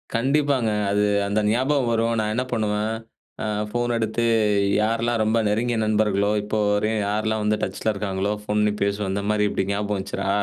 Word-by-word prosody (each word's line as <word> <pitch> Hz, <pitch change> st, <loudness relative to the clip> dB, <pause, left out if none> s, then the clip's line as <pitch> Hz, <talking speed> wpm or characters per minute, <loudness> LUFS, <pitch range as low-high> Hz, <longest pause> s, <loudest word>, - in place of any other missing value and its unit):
கண்டிப்பாங்க. 135 Hz, -1 st, +1 dB, 0.2 s
அது 105 Hz, +1 st, +2 dB, 0.3 s
அந்த 100 Hz, +2 st, 0 dB
ஞாபகம் 130 Hz, +2 st, +1 dB
வரும். 115 Hz, +1 st, +1 dB
நான் 105 Hz, 0 st, 0 dB
என்ன 125 Hz, +3 st, 0 dB
பண்ணுவேன். 105 Hz, 0 st, 0 dB, 0.5 s
அ -, -, -2 dB, 0.2 s
ஃபோன் 120 Hz, +2 st, -1 dB
எடுத்து 110 Hz, +1 st, -1 dB, 0.6 s
யாரெல்லாம் 115 Hz, +1 st, 0 dB
ரொம்ப 110 Hz, +2 st, +1 dB
நெருங்கிய 115 Hz, +3 st, 0 dB
நண்பர்களோ, 105 Hz, -2 st, +1 dB
இப்போ 110 Hz, +1 st, -2 dB
வரையும் 105 Hz, +1 st, +1 dB
யாரெல்லாம் 110 Hz, +1 st, -1 dB
வந்து 105 Hz, 0 st, +1 dB
டச்ல 95 Hz, +3 st, -1 dB
இருக்காங்களோ 100 Hz, 0 st, -2 dB
ஃபோன் 105 Hz, 0 st, -1 dB
பண்ணி 105 Hz, 0 st, +2 dB
பேசுவேன். 100 Hz, -1 st, 0 dB
இந்த 100 Hz, 0 st, -2 dB
மாரி 105 Hz, 0 st, +2 dB
இப்டி 95 Hz, -, -1 dB
ஞாபகம் 105 Hz, 0 st, -1 dB
வந்துச்சுரா, 95 Hz, 0 st, -3 dB
110 Hz, 165 wpm, -23 LUFS, 105-115 Hz, 0.6 s, அது